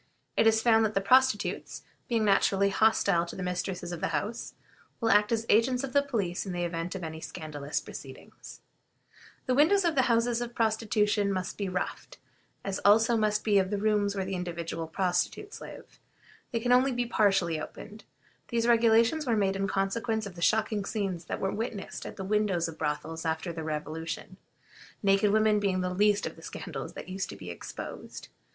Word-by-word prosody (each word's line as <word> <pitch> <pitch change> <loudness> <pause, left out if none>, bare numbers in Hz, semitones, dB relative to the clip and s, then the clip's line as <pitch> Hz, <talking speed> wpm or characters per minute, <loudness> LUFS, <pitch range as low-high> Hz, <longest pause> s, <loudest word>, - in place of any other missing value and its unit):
It - - +4
is 220 0 +3
found 225 -2 +5
that 215 -1 0
the - - +4
prostitutes, 255 +1 +2 0.3
being 230 -3 +1
naturally 200 0 +3
hostile 200 -4 +3
to - - -8
the 185 - -5
mistresses 180 0 -3
of 175 - -6
the - - +1
houses, 170 +9 -3 0.4
will 225 -2 +2
act 210 +1 +4
as 230 -1 0
agents 245 +4 +3
of 270 - -5
the 285 - +5
police 210 -11 -2
in 190 - -5
the 175 0 -2
event 170 +1 -3
of 185 - -5
any 160 0 -6
scandalous 150 -4 -4
proceedings. - - -11 0.8
The 255 - +1
windows 340 +8 +4
of 335 -2 +2
houses 240 -2 +2
of 240 0 -5
prostitution 215 -2 +1
must 185 -1 -3
be 200 -2 -3
roughed, 185 - -4 0.5
as 195 -1 -2
also 225 +3 +5
must 215 -1 +1
those 205 -2 +4
of 195 +2 -1
rooms 205 -2 +2
where 190 -1 -2
individual 170 -3 -4
prostitutes 185 - -2
live. - - -11 0.5
They 230 - 0
can 245 +2 0
only 255 +2 +5
be 245 -1 -1
partially 195 -8 +2
opened. 210 +6 -9 0.4
These 235 -1 0
regulations 235 +5 +4
were 230 -2 +2
made 195 -2 +1
in 195 0 -1
consequence 220 +3 -1
of 200 - -7
the 170 - -10
shocking 215 +2 +2
scenes 195 -5 -3
that - - -4
were 195 - -1
witnessed 220 -2 -5
at - - -8
the 190 - -6
windows 195 -4 +1
of 165 - -9
brothels 160 +1 -3
after 160 +1 -2
the 160 -1 -5
Revolution, 155 +1 -5 0.7
naked 195 +1 +4
women 215 0 +3
being 190 -2 0
the 180 0 -2
least 205 +1 +3
of - - -6
the - - -13
scandals 155 -4 -7
that - - -8
used 190 +1 -4
to - - -7
be - - -8
exposed. - - -8
200 Hz, 185 wpm, -29 LUFS, 180-225 Hz, 0.8 s, found